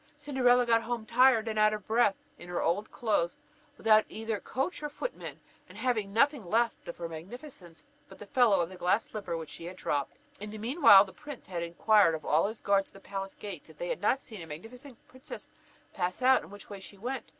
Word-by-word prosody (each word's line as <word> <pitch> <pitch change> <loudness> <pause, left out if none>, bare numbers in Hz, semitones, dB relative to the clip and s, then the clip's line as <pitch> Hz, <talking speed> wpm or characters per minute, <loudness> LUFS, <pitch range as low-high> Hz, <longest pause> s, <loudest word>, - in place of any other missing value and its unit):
Cinderella 255 -4 +3
got 230 -1 +3
home 230 -1 -4
tired 250 -1 +4
and 215 -1 -1
out 215 0 +4
of 210 - -9
breath, 225 -2 +3 0.2
in 175 - -11
her 175 - -2
old 190 +6 0
clothes, 205 -7 0 0.4
without 215 -1 +5
either 220 -1 -4
coach 270 +7 -3
or 295 - -3
footmen, - - -6 0.3
and - - -13
having 220 -6 -1
nothing 280 +3 +2
left 230 +6 0
of 170 - -7
her 170 - -4
magnificence 175 - -11 0.2
but - - -13
the 210 - -10
fellow 220 -3 +3
of 170 - -2
the 185 - -11
glass 185 +5 +2
slipper 195 -6 -5
which 160 -2 -8
she 165 - -9
had 180 +2 -7
dropped. 145 -6 -2 0.2
In 210 +1 -7
the 215 - -8
mean 250 +10 -4
while, 200 -7 +9
the 190 - -13
prince 295 -4 -10
had 175 -2 -4
inquired 170 +1 +3
of 155 - -8
all 155 +5 +3
his 220 +1 -7
guards 200 -1 +2
at - - -23
the - - -11
palace 195 -1 -5
gates, 195 -7 -9
if - - -16
they - - -4
had - - -3
not 265 - +2
seen 220 -8 -10
a 165 - -9
magnificent 230 - -10
princess 260 +1 -10 0.4
pass 180 +5 -3
out, 260 +1 +5
and - - -13
which 205 -1 -12
way 200 -1 -8
she 195 +1 -12
went? 245 +3 -4
215 Hz, 230 wpm, -30 LUFS, 185-245 Hz, 0.4 s, while